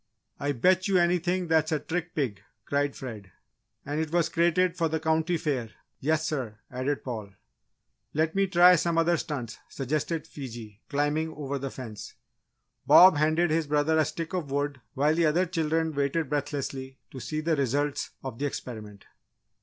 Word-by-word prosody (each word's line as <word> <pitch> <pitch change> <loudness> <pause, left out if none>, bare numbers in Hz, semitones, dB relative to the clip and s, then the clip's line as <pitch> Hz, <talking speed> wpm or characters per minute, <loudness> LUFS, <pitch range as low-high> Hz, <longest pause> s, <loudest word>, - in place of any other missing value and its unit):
"I 145 0 0
bet 185 - +3
you 195 -2 +3
anything 175 +1 +1
that's 160 0 +2
a 155 - +2
trick 170 +4 -4
pig!" 125 -10 -2 0.2
cried 145 0 0
Fred. 110 -7 -8 0.5
"And 145 +2 -2
it 160 -1 -3
was 170 -1 +2
crated 175 +2 +2
for 165 -2 0
the 160 +1 -1
County 160 +2 +1
Fair 135 -8 -2 0.3
yes 155 +2 +1
sir!" 130 -10 -3
added 130 +3 -2
Paul. 110 -6 -6 0.8
"Let 160 +1 +1
me 195 0 +2
try 180 -1 +7
some 170 +1 0
other 165 +1 +3
stunts," 135 -9 -4
suggested 155 +4 -2
Fiji, 115 -6 -9
climbing 145 +2 0
over 140 -2 -3
the 135 +1 -4
fence. 115 -6 -8 0.7
Bob 185 -4 +9
handed 155 +2 +2
his 160 -1 +1
brother 150 +2 +2
a 155 - +4
stick 165 0 -5
of 175 -6 -2
wood 140 -1 -2
while 145 +3 +3
the 165 0 +3
other 170 +5 +2
children 160 -2 0
waited 140 +1 0
breathlessly 135 -2 -3
to 130 - -8
see 155 +5 -3
the 160 +1 +1
results 140 +1 0
of 130 -4 -6
the 145 - 0
experiment. 105 -7 -7
150 Hz, 170 wpm, -27 LUFS, 135-165 Hz, 0.8 s, Bob